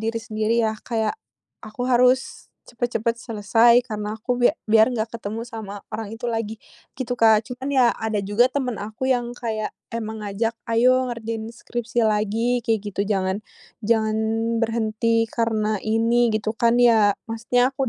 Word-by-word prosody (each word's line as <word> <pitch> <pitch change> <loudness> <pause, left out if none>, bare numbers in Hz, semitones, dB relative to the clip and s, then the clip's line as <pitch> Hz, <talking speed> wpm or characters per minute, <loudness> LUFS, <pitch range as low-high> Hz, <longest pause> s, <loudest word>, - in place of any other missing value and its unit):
diri 225 +1 -2
sendiri 220 +1 0
ya, 220 0 0
kayak 220 -3 -1 0.5
aku 215 +3 -5
harus 250 +1 +2 0.2
cepet-cepet 235 -1 -1
selesai 230 +2 +3
karena 210 -3 -4
aku 245 +3 -2
bia 245 +5 +4
biar 220 +3 +5
enggak 225 -1 -2
ketemu 220 0 -5
sama 205 -3 -7
orang 215 0 -5
itu 240 +2 -6
lagi, 225 -1 -3 0.4
gitu 250 -1 -3
Kak. 220 -1 +5
Cuman 255 +2 -5
ya, 255 -3 +5
ada 220 -2 -1
juga 205 +5 +3
temen 255 -6 -2
aku 220 +5 -4
yang 245 -1 0
kayak 220 -2 -3 0.2
emang 220 -1 -4
ngajak, 210 +3 -1 0.2
"Ayo 255 +3 +3
ngerjain 225 -1 -5
skripsi 235 0 -2
lagi," 220 +3 +1
kayak 225 -2 +1
gitu, 200 - -1
"jangan 190 0 0 0.4
jangan 220 0 +1 0.5
berhenti 230 0 +1
karena 215 -2 0
ini," 230 +2 +2
gitu 215 0 -1
kan 235 +1 +2
ya, 220 -4 +5
maksudnya 240 +3 +1
aku 270 -1 -1
225 Hz, 155 wpm, -23 LUFS, 215-240 Hz, 0.5 s, biar